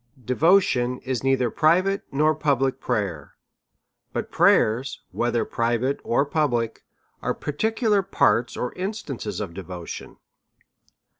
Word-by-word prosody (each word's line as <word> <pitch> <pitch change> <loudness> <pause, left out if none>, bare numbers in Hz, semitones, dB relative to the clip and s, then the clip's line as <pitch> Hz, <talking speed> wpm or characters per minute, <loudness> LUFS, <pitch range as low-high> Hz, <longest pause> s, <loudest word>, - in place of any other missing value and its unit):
xJevotion 130 - +3
is 130 -2 -2
neither 130 -3 +2
private 185 +5 +3
nor 155 +3 +3
public 135 -3 0
prayer; 100 - -3 0.8
but - - -3
pmyers^ 120 +5 +3
whether 120 0 0
private 120 +4 0
or 135 +4 +1
public^ 120 -7 0 0.4
are - - -1
particular 215 - 0
parts 125 -10 +1
or 125 - -3
instances 155 - -4
of 100 -5 -5
devotion. 90 -2 -8
130 Hz, 105 wpm, -24 LUFS, 115-155 Hz, 0.8 s, xJevotion